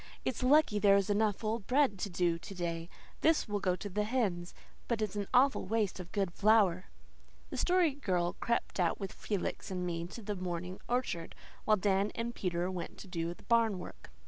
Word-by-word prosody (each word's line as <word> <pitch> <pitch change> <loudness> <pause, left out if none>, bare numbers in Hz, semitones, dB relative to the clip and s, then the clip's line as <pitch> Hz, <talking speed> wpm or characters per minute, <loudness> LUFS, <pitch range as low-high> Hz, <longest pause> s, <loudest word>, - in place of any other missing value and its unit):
"It's 250 - -1
lucky 255 -4 +4
there's 200 0 +4
enough 210 0 +1
old 215 -1 -2
bread 260 -7 +3
to 200 - -2
do 175 -2 +1
to 195 - -9
day. 170 -1 -3 0.3
This 320 -4 +3
will 205 -1 -1
go 185 -2 +1
to 205 - -6
the 205 +2 -1
hens. 205 -7 -1 0.3
But 235 -2 0
it's 210 -2 -2
an 205 -1 -2
awful 260 -3 +4
waste 210 -3 0
of 180 -1 -8
good 195 -4 -1
flour." 200 -4 +4 0.7
The - - -4
Story 355 -4 +3
Girl 180 -11 0
crept 235 -3 -1
out 175 -2 +1
with 195 -2 -5
Felix 200 -4 -3
and 180 -1 -3
me 170 -1 -3
to 225 +5 -9
the 205 0 -3
morning 180 0 -4
orchard, 240 -9 -2 0.3
while 215 -1 +4
Dan 195 +1 +1
and 235 +1 -3
Peter 180 -2 -1
went 175 -2 -6
to - - -10
do 170 -1 -3
the - - -19
barn 230 -4 +3
work. 180 - -10
200 Hz, 200 wpm, -32 LUFS, 180-225 Hz, 0.7 s, lucky